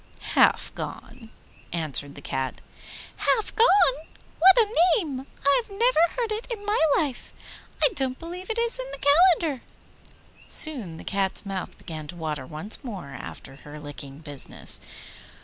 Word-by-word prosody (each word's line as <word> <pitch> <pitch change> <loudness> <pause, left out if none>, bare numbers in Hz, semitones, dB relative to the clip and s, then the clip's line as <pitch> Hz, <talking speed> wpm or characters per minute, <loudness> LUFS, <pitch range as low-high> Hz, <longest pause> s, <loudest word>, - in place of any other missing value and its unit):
'Half - - +3
Gone,' 225 -2 -9 0.4
answered 145 -4 0
the 145 - -12
Cat. 130 -1 -4 0.6
'Halfgone! 405 - +2 0.3
what 380 +5 +7
a 445 -2 +3 0.2
name! 280 - -5 0.2
I 280 - +4
have 455 - -21
never 465 +4 +1 0.2
heard 470 -3 -2
it 430 +2 -4
in 415 -3 -6
my 420 +1 0 0.2
life. 280 -6 -3 0.5
I - - +5
don't 260 -1 0
believe 355 +3 -9
it 450 - -3
is 470 +1 0
in - - -6
the - - -5 0.3
calendar.' 290 -7 -4 0.8
Soon 235 - +6
the - - -11
Cat's 195 0 -2
mouth 195 -2 -6
began 155 -2 -9
to 175 - -9
water 155 -5 -5
once 155 +10 -5
more 195 - -8
after 135 0 -10
her 150 +1 -12
licking 145 -1 -9
business. 145 -4 +2
255 Hz, 150 wpm, -24 LUFS, -, 0.8 s, what